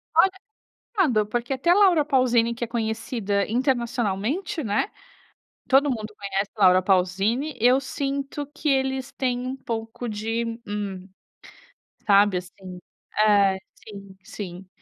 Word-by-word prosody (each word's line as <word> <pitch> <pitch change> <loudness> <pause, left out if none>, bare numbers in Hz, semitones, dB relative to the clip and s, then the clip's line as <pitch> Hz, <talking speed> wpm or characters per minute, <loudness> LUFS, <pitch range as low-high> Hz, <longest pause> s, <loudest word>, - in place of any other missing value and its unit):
Olha, 385 - +6 0.7
complicado, 250 - +3
porque 240 +4 -2
até 270 +6 -1
a 355 - +7
Laura 360 -7 +5
Paulzini 245 -4 +2
que 235 - -5
é - - -2
conhecida 220 -3 -1
internacionalmente 245 - -1
né, 210 - 0 0.8
todo 280 +2 +4
mundo 220 -4 -3
conhece 195 0 -2
Laura 185 -2 +6
Paulzini, 195 +10 +1
eu 250 +3 +5
sinto 275 +1 -4
que 310 -1 -2
eles 265 -1 0
têm 250 -2 -1
um 260 +1 -3
pouco 230 -1 -5
de, 225 +2 -3
hum, 200 -3 -5 1.0
sabe 200 -1 +5
assim, 180 0 -10 0.4
é, 200 -3 +4 0.2
sim, 200 -3 -12
sim, 185 -2 -8
230 Hz, 125 wpm, -24 LUFS, 200-265 Hz, 1.0 s, a